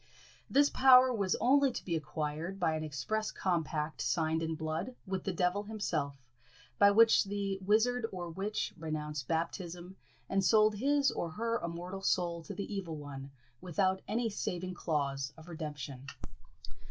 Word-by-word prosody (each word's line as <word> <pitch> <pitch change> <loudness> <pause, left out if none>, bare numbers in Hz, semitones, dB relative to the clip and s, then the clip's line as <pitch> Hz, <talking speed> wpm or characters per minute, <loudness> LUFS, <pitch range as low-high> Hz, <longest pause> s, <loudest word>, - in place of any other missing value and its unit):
This 285 +1 +4
power 255 -1 +7
was 200 -4 +1
only 275 +1 +4
to - - -6
be 170 - -1
acquired 155 +4 -3
by 165 -3 +2
an 155 - -3
express 215 +9 -2
compact, 160 -4 -1
signed 160 -1 +1
in 160 0 -2
blood, 160 +10 -3
with 190 -2 -3
the 195 - 0
devil 180 +2 +1
himself, 150 - -3 0.5
by 200 - +8
which 225 +1 +6
the 200 -1 -2
wizard 225 +4 +2
or 180 -2 -5
witch 200 +5 -2
renounced 150 -4 -4
baptism, 175 +2 -3 0.3
and 195 0 +1
sold 215 +1 +5
his 280 +3 +3
or 170 - -3
her 230 +7 -2
immortal 175 +3 -5
soul 175 -3 0
to - - -7
the 205 +1 -5
evil 180 -5 -4
one, 140 -2 -8 0.3
without 185 +2 0
any 230 +3 0
saving 185 -3 -3
clause 140 -5 -2
of 160 +1 -13
redemption. 145 -5 -6
180 Hz, 155 wpm, -32 LUFS, 155-210 Hz, 0.5 s, by